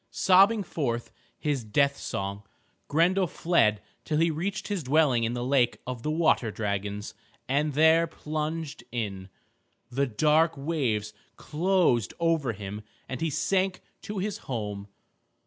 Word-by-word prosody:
Sobbing 200 Hz, +3 st, +4 dB
forth 120 Hz, -9 st, -3 dB, 0.3 s
his 145 Hz, -5 st, -1 dB
death 140 Hz, +6 st, +2 dB
song, 100 Hz, -3 st, -4 dB, 0.5 s
Grendel 180 Hz, +5 st, +3 dB
fled 110 Hz, -, +2 dB, 0.2 s
till 155 Hz, -, -1 dB
he 165 Hz, +1 st, +3 dB
reached 195 Hz, +7 st, -3 dB
his 205 Hz, -4 st, -2 dB
dwelling 135 Hz, -4 st, +3 dB
in 115 Hz, -, -1 dB
the 120 Hz, 0 st, -3 dB
lake 130 Hz, -2 st, +2 dB
of 125 Hz, -2 st, -5 dB
the 150 Hz, -, -2 dB
water 155 Hz, -7 st, +2 dB
dragons, 105 Hz, -1 st, -3 dB, 0.3 s
and 145 Hz, +3 st, +1 dB
there 160 Hz, +3 st, +5 dB
plunged 155 Hz, 0 st, -4 dB
in. 100 Hz, -5 st, -4 dB, 0.6 s
The 140 Hz, +3 st, +1 dB
dark 155 Hz, +7 st, +2 dB
waves 130 Hz, -9 st, -1 dB, 0.2 s
closed 165 Hz, -, +1 dB
over 165 Hz, -7 st, +1 dB
him 100 Hz, +1 st, -7 dB, 0.3 s
and 130 Hz, -, -5 dB
he 165 Hz, -, +1 dB
sank 185 Hz, +5 st, 0 dB, 0.2 s
to 210 Hz, -, -6 dB
his 200 Hz, +2 st, -2 dB
home. 105 Hz, -5 st, -4 dB
145 Hz, 135 wpm, -27 LUFS, 115-165 Hz, 0.6 s, there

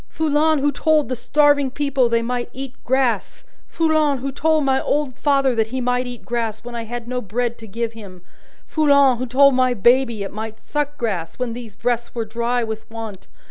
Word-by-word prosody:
Foulon 315 Hz, 0 st, +2 dB
who 290 Hz, +1 st, +1 dB
told 305 Hz, +1 st, +2 dB
the 255 Hz, -, -1 dB
starving 285 Hz, +2 st, +3 dB
people 270 Hz, -2 st, +1 dB
they 230 Hz, 0 st, +1 dB
might 245 Hz, 0 st, -2 dB
eat 265 Hz, -1 st, -6 dB
grass! 250 Hz, -5 st, 0 dB, 0.2 s
Foulon 310 Hz, -3 st, +2 dB
who 270 Hz, +2 st, -4 dB
told 310 Hz, +1 st, +1 dB
my 265 Hz, 0 st, +2 dB
old 285 Hz, -4 st, -1 dB
father 275 Hz, -2 st, +2 dB
that 225 Hz, -2 st, +1 dB
he 260 Hz, +3 st, -4 dB
might 250 Hz, 0 st, 0 dB
eat 245 Hz, -1 st, -9 dB
grass, 230 Hz, -2 st, -3 dB
when 245 Hz, 0 st, -8 dB
I 230 Hz, -1 st, -4 dB
had 240 Hz, +1 st, -6 dB
no 250 Hz, 0 st, -2 dB
bread 235 Hz, +3 st, -2 dB
to 225 Hz, -, -10 dB
give 230 Hz, +3 st, -3 dB
him! 195 Hz, -5 st, -12 dB, 0.4 s
Foulon 280 Hz, -5 st, +4 dB
who 255 Hz, -, -3 dB
told 275 Hz, +3 st, +5 dB
my 255 Hz, -1 st, +2 dB
baby 235 Hz, 0 st, +3 dB
it 195 Hz, -, -7 dB
might 220 Hz, +1 st, -6 dB
suck 295 Hz, +2 st, -3 dB
grass, 195 Hz, -9 st, -3 dB
when 250 Hz, -2 st, -2 dB
these 230 Hz, -4 st, -9 dB
breasts 240 Hz, 0 st, -2 dB
were 230 Hz, -1 st, -2 dB
dry 235 Hz, +2 st, -1 dB
with 220 Hz, -1 st, -6 dB
want! 225 Hz, -4 st, -8 dB
245 Hz, 200 wpm, -21 LUFS, 230-280 Hz, 0.4 s, told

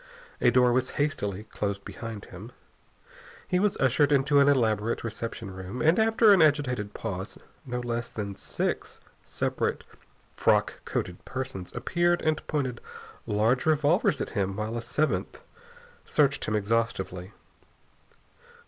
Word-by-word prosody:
A -, -, +6 dB
door 125 Hz, 0 st, +4 dB
was 130 Hz, +1 st, +1 dB
hastily 105 Hz, -9 st, -1 dB
closed 100 Hz, -2 st, -4 dB
behind 115 Hz, -3 st, -7 dB
him. 105 Hz, +7 st, -10 dB, 1.0 s
He 180 Hz, -, +1 dB
was 205 Hz, 0 st, +1 dB
ushered 135 Hz, +3 st, +3 dB
into 140 Hz, +1 st, +4 dB
an 140 Hz, -, +5 dB
elaborate 115 Hz, -5 st, +2 dB
reception 115 Hz, -2 st, -5 dB
room 95 Hz, +5 st, -7 dB
and, 160 Hz, -, +4 dB
after 220 Hz, -1 st, +5 dB
an 190 Hz, -, +5 dB
agitated 130 Hz, -9 st, +2 dB
pause, 95 Hz, -2 st, -5 dB, 0.3 s
no 125 Hz, 0 st, -3 dB
less 120 Hz, -1 st, -3 dB
than 100 Hz, -2 st, -5 dB
six -, -, -3 dB, 0.2 s
separate -, -, -2 dB, 0.5 s
frock -, -, +1 dB
coated 90 Hz, -1 st, -3 dB
persons 130 Hz, -9 st, -5 dB
appeared 175 Hz, 0 st, +1 dB
and 155 Hz, 0 st, +1 dB
pointed 130 Hz, -5 st, -2 dB, 0.5 s
large 110 Hz, +7 st, +1 dB
revolvers 155 Hz, -, +3 dB
at -, -, -3 dB
him 100 Hz, -2 st, -1 dB
while 110 Hz, +2 st, -3 dB
a 120 Hz, -, -2 dB
seventh 155 Hz, +6 st, -1 dB, 0.6 s
searched 140 Hz, -2 st, +1 dB
him 110 Hz, -, -1 dB
exhaustively. 100 Hz, -4 st, -1 dB
120 Hz, 130 wpm, -27 LUFS, 105-145 Hz, 1.0 s, A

